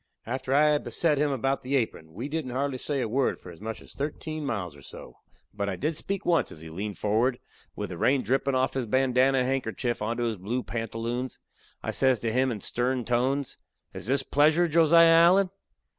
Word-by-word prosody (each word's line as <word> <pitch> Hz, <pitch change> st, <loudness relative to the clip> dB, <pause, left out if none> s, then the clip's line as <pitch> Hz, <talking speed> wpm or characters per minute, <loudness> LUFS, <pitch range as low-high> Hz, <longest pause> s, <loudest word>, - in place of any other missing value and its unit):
After 130 Hz, +2 st, -4 dB
I 150 Hz, +2 st, +5 dB
had 150 Hz, -1 st, +1 dB
beset 155 Hz, -4 st, +1 dB
him 150 Hz, 0 st, +2 dB
about 135 Hz, 0 st, 0 dB
the 135 Hz, +2 st, -2 dB
apron, 110 Hz, -10 st, -2 dB
we 120 Hz, +7 st, -4 dB
didn't 150 Hz, -3 st, -3 dB
say -, -, -6 dB
hardly 140 Hz, +1 st, -1 dB
a -, -, -2 dB
word 130 Hz, +4 st, 0 dB
for 90 Hz, -, -11 dB
as 85 Hz, -, -14 dB
much 110 Hz, +1 st, -6 dB
as -, -, -15 dB
thirteen 155 Hz, +2 st, -4 dB
miles 100 Hz, -, -3 dB
or 70 Hz, -, -14 dB
so; -, -, -11 dB, 0.4 s
but 100 Hz, -1 st, -2 dB
I 95 Hz, -, -2 dB
did 150 Hz, -, -2 dB
speak 195 Hz, +4 st, -4 dB
once, 170 Hz, -2 st, +2 dB
as -, -, -10 dB
he 80 Hz, -1 st, -9 dB
leaned 100 Hz, +4 st, -5 dB
forward, 115 Hz, +5 st, +1 dB, 0.4 s
with 105 Hz, -3 st, -5 dB
the 85 Hz, -, -7 dB
rain 135 Hz, 0 st, +3 dB
drippin' 135 Hz, +3 st, +1 dB
offen 130 Hz, +1 st, +1 dB
his 120 Hz, -, -3 dB
bandanna 130 Hz, +2 st, +3 dB
handkerchief 125 Hz, -2 st, -2 dB
onto 115 Hz, +3 st, -1 dB
his 115 Hz, -3 st, -1 dB
blue 115 Hz, +7 st, -3 dB
pantaloons. 115 Hz, +2 st, -4 dB, 0.4 s
I -, -, -2 dB
says 130 Hz, -2 st, +2 dB
to 115 Hz, -1 st, -1 dB
him 130 Hz, +2 st, +2 dB
in 105 Hz, -4 st, -5 dB
stern 125 Hz, +2 st, -1 dB
tones: 130 Hz, +3 st, 0 dB, 0.3 s
"Is -, -, -7 dB
this 135 Hz, +1 st, +1 dB
pleasure, 155 Hz, +6 st, +3 dB
Josiah 165 Hz, +1 st, +6 dB
Allen?" 175 Hz, +3 st, +5 dB
130 Hz, 205 wpm, -27 LUFS, 115-140 Hz, 0.4 s, Josiah